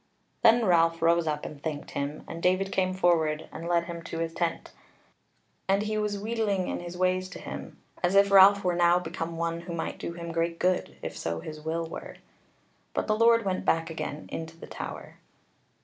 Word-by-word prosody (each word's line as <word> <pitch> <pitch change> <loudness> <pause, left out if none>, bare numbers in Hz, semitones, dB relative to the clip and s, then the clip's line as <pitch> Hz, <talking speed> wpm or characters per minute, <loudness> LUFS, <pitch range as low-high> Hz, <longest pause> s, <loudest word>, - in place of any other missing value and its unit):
Then 230 +1 +6
Ralph 165 -2 +4
rose 170 0 +3
up 150 -1 -2
and 145 -2 -8
thanked 150 -2 -4
him, 140 +2 -4
and 165 - -7
David 185 +2 +2
came 185 -1 +1
forward, 165 -4 +1
and 165 +2 -7
led 170 -1 +2
him 170 -1 -6
to 165 - -5
his 165 0 -2
tent. 170 -1 -2 1.0
And 195 +1 +3
he 215 0 -2
was 210 -1 -1
wheedling 205 -3 -1
in - - -2
his 175 0 -7
ways 185 0 +1
to - - -9
him, - - -8 0.2
as 180 +2 +1
if 200 0 +5
Ralph 200 +1 +8
were 180 -1 +2
now 175 0 +4
become 165 -1 -4
one 170 0 -1
who 170 0 -6
might 165 - -4
do 170 - -4
him 170 0 -6
great 165 0 -1
good 185 +1 0
if - - -4
so 85 0 -3
his 155 - -8
will 165 +2 -2
were. - - -8 0.8
But - - 0
the 215 - +1
Lord 230 0 +4
went 185 -1 -1
back 165 0 +1
again 155 -2 -5
into 160 0 -6
the - - -10
Tower. - - -7
170 Hz, 200 wpm, -28 LUFS, 165-190 Hz, 1.0 s, Ralph